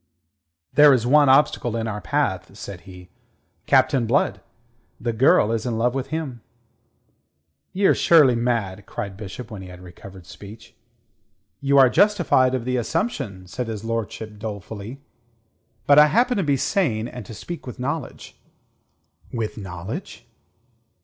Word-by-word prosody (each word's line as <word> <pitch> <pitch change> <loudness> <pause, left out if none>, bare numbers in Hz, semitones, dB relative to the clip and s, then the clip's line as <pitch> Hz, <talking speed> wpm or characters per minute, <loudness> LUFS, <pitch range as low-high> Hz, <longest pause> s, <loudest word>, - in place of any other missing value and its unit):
"There 145 +1 +7
is 120 -2 -2
one 145 +2 +5
obstacle 130 -4 +3
in 115 0 -2
our 105 -1 -4
path," 85 - -2
said 95 -3 -8
he. 90 -1 -13 0.6
"Captain 125 -4 +3
Blood. 135 +5 +1 0.6
The 120 -1 -2
girl 110 -2 +4
is 115 -1 -1
in 120 -3 -2
love 120 +2 +1
with 135 0 -3
him." 140 -5 -5 1.3
"Ye're 195 +1 +3
surely 150 -7 +5
mad!" 115 -5 -2
cried 100 -2 -6
Bishop, 110 +4 -9
when 105 -3 -7
he 95 - -10
had 90 -1 -11
recovered 90 +1 -13
speech. 105 +5 -13 0.8
"You 140 0 +2
are 135 -1 +8
justified 165 - +3
of 120 -2 -4
the 125 0 -1
assumption," 115 - -3
said 120 +7 -5
his 110 -2 -5
lordship 110 -2 -5
dolefully. 110 +4 -7 0.8
"But 145 +1 +6
I 150 - +8
happen 240 +8 +2
to 195 - +1
be 145 -3 +1
sane, 120 - 0
and 125 -1 -8
to 115 - -9
speak 175 +2 -8
with 125 - -7
knowledge." 145 +5 -5 0.9
"With 115 -3 -3
knowledge?" 105 - -8
120 Hz, 145 wpm, -22 LUFS, 105-140 Hz, 1.3 s, are